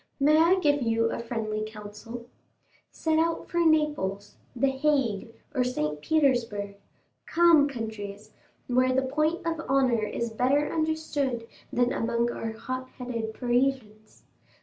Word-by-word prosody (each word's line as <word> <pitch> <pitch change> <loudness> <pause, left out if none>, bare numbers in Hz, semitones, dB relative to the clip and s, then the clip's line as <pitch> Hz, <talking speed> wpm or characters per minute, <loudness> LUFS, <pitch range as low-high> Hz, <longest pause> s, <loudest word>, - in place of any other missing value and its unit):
May 300 +2 +5
I 335 +3 +5
give 290 -4 +2
you 230 -1 +1
a - - -3
friendly 225 -2 -3
counsel? 215 +2 -8 0.6
Set 315 -1 0
out 330 0 0
for 345 - -1
Naples, 295 - +1 0.2
the 270 +3 +2
Hague, 265 -6 0 0.2
or 260 -3 +2
St. 150 -12 -2
Petersburg—calm 270 - +1
countries, 215 -4 -6 0.3
where 255 +1 +2
the 265 - +2
point 305 +6 0
of 330 -1 -1
honor 260 -4 +3
is 230 +2 -2
better 275 +6 +1
understood 300 -7 -1 0.2
than 245 0 +2
among 235 +1 0
our 225 -1 -4
hot 255 +3 -5
headed 230 -3 -4
Parisians. 245 -4 -1
250 Hz, 125 wpm, -27 LUFS, 220-290 Hz, 0.6 s, May